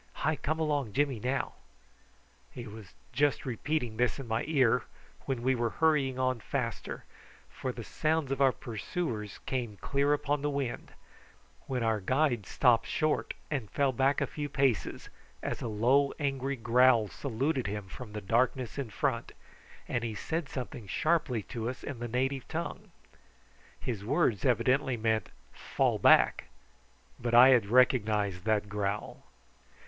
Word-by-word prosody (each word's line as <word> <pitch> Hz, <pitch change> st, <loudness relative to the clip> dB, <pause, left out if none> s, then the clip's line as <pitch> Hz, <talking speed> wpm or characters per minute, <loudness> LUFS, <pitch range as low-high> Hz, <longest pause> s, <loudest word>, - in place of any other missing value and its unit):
Hi 155 Hz, -, +2 dB
come 155 Hz, +2 st, -2 dB
along 145 Hz, -8 st, 0 dB
Jimmy 140 Hz, -2 st, +1 dB
now." 130 Hz, +4 st, -1 dB, 1.0 s
He 120 Hz, -, -8 dB
was 105 Hz, -3 st, -11 dB, 0.2 s
just 145 Hz, +3 st, +1 dB
repeating 125 Hz, -1 st, -2 dB
this 125 Hz, +1 st, +1 dB
in 135 Hz, -3 st, -7 dB
my 110 Hz, +1 st, 0 dB
ear 135 Hz, -7 st, +3 dB, 0.5 s
when 130 Hz, -3 st, -2 dB
we 130 Hz, +1 st, +3 dB
were 120 Hz, -2 st, 0 dB
hurrying 145 Hz, -3 st, +2 dB
on 130 Hz, -1 st, 0 dB
faster, 115 Hz, 0 st, -4 dB, 0.5 s
for 135 Hz, -3 st, -4 dB
the 120 Hz, -2 st, -7 dB
sounds 155 Hz, +2 st, -1 dB
of 135 Hz, 0 st, -1 dB
our 135 Hz, -1 st, +6 dB
pursuers 115 Hz, -, -4 dB
came 120 Hz, -6 st, -3 dB
clear 140 Hz, +5 st, 0 dB
upon 145 Hz, 0 st, 0 dB
the 145 Hz, -, 0 dB
wind, 140 Hz, -4 st, -3 dB, 0.7 s
when 130 Hz, -3 st, -1 dB
our 110 Hz, -1 st, +1 dB
guide 125 Hz, 0 st, +1 dB
stopped 120 Hz, -4 st, +3 dB
short 155 Hz, -1 st, 0 dB, 0.2 s
and 130 Hz, -9 st, -2 dB
fell 140 Hz, -2 st, +1 dB
back 135 Hz, +2 st, +2 dB
a -, -, +3 dB
few 145 Hz, -1 st, -5 dB
paces 135 Hz, -10 st, 0 dB, 0.3 s
as -, -, -3 dB
a -, -, -2 dB
low 125 Hz, +6 st, +3 dB
angry 140 Hz, -2 st, -1 dB
growl 120 Hz, -1 st, +4 dB
saluted 135 Hz, +2 st, -2 dB
him 100 Hz, -1 st, -4 dB
from 105 Hz, +2 st, -9 dB
the 105 Hz, -, -4 dB
darkness 125 Hz, +5 st, 0 dB
in 135 Hz, -5 st, -3 dB
front 120 Hz, 0 st, -2 dB, 0.5 s
and 120 Hz, -, -1 dB
he 115 Hz, -2 st, -3 dB
said 160 Hz, +4 st, -3 dB
something 125 Hz, -4 st, -6 dB
sharply 140 Hz, -, +1 dB
to 115 Hz, 0 st, -4 dB
us 130 Hz, -, -7 dB
in 140 Hz, -5 st, -6 dB
the 120 Hz, -, -3 dB
native 130 Hz, +2 st, -1 dB
tongue. 165 Hz, +1 st, -5 dB, 0.9 s
His 110 Hz, -6 st, -4 dB
words 105 Hz, -1 st, +1 dB
evidently 130 Hz, +1 st, +2 dB
meant 110 Hz, -3 st, 0 dB, 0.2 s
"Fall -, -, 0 dB
back!" -, -, +5 dB, 0.7 s
but 120 Hz, -1 st, 0 dB
I 125 Hz, +2 st, +9 dB
had 120 Hz, -6 st, +5 dB
recognised 105 Hz, -6 st, +2 dB
that 105 Hz, -2 st, +1 dB
growl. 105 Hz, 0 st, -3 dB
125 Hz, 155 wpm, -30 LUFS, 110-140 Hz, 1.0 s, I